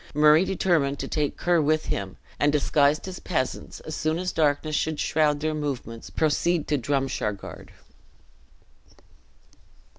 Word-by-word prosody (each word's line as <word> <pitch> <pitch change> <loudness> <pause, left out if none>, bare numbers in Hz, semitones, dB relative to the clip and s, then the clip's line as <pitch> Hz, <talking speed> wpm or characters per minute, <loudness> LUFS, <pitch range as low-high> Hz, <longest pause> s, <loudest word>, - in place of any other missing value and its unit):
Murray 150 +3 +6
determined 165 -8 +1
to - - -4
take 150 -3 -1
Ker 175 -2 +2
with 155 +1 +1
him; 95 -2 -4 0.2
and, 145 - +3
disguised 145 +2 +2
as 185 -1 -6
peasants, 130 -8 -3
as 155 - -6
soon 155 +1 0
as 185 +1 -2
darkness 155 0 +1
should 155 0 -1
shroud 150 -2 +1
their 155 0 0
movements, 135 -6 -5
proceed 160 +1 +1
to 150 - +2
Drumshargard. 130 -6 -3
150 Hz, 130 wpm, -25 LUFS, 140-160 Hz, 0.2 s, Murray